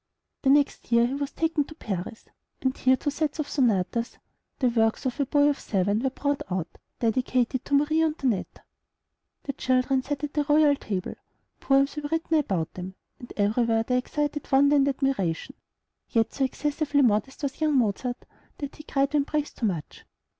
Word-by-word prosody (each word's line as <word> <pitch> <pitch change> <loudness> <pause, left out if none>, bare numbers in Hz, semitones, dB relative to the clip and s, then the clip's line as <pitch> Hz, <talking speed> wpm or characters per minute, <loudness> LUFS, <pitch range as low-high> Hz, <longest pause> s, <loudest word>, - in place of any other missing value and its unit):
The 270 - +2
next 285 -3 +2
year 235 0 +5
he 245 - -2
was 280 0 -2
taken 325 -2 0
to 310 - -12
Paris, 200 - -5 0.3
and 260 -1 0
here 260 0 +3
two 290 - -2
sets 300 +1 -2
of 305 -2 -2
sonatas, 230 -2 0 0.4
the 255 - +2
works 225 0 +1
of 260 +2 -2
a 280 - +1
boy 290 +1 +4
of 290 - +1
seven, 200 +1 0
were 265 +3 0
brought 285 +2 -2
out, 180 -3 -4 0.2
dedicated 250 +2 0
to 285 - +1
Marie 305 +3 +3
Antoinette. 280 - -1 0.8
The 275 - -3
children 260 0 +1
sat 285 +2 -4
at 295 - -3
the 295 - +1
royal 295 -1 +5
table, 195 -8 -4 0.5
poems 275 +2 +2
were 295 -1 -3
written 325 -1 +1
about 185 - -2
them, 185 +1 -7 0.2
and 245 - -11
everywhere 225 +2 +2
they 250 +2 +1
excited 295 +3 -3
wonder 280 +2 +5
and 280 -1 +4
admiration; 270 - -1 0.6
yet 225 -1 +1
so 270 - +1
excessively 290 +1 0
modest 245 +5 +1
was 280 +2 -3
young 305 -3 +3
Mozart, 245 +2 0 0.4
that 285 -1 -6
he - - -9
cried 275 -1 0
when 290 -2 +3
praised 300 0 -3
too 230 - +1
much. 170 -7 -5
270 Hz, 180 wpm, -26 LUFS, 230-290 Hz, 0.8 s, year